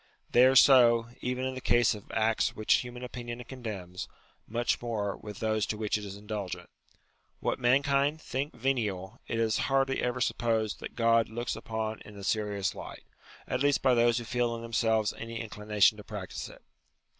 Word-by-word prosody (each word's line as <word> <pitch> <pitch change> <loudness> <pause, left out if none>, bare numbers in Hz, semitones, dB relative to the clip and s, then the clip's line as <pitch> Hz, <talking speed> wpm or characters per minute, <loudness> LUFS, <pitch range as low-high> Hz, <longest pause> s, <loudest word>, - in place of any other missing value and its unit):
They 125 +2 +7
are 130 - +3
so, 120 -4 +7
even 125 +1 -2
in 130 - -2
the 130 - -6
case 120 -2 +3
of 105 -2 -11
acts 110 0 +1
which 110 - +2
human 125 0 -6
opinion 120 -1 -6
condemns: 105 -9 -6 0.4
much 120 +2 0
more, 105 -4 -2
with 105 -2 -9
those 110 -1 0
to 105 - -2
which 105 -1 -1
it 105 - -2
is 100 -1 -7
indulgent. 105 -2 -6 0.7
What - - -1
mankind 140 +4 +2
think 140 0 -4
venial, 110 -5 -2
it 115 - -2
is 115 -1 +1
hardly 135 0 +2
ever 125 0 -1
supposed 115 -3 0
that - - -8
God 115 -1 +3
looks 120 +2 -3
upon 110 -1 -4
in 105 -1 -12
a 100 - -9
serious 105 -2 0
light: - - -9 0.4
at 125 - -1
least 145 0 +2
by 130 -1 +5
those 120 -1 +4
who 120 - -2
feel 120 0 0
in 115 - -7
themselves 110 -2 +1
any 115 0 -5
inclination 105 -1 +2
to 105 - -9
practise - - -6
it. - - -15
115 Hz, 180 wpm, -29 LUFS, 105-125 Hz, 0.7 s, They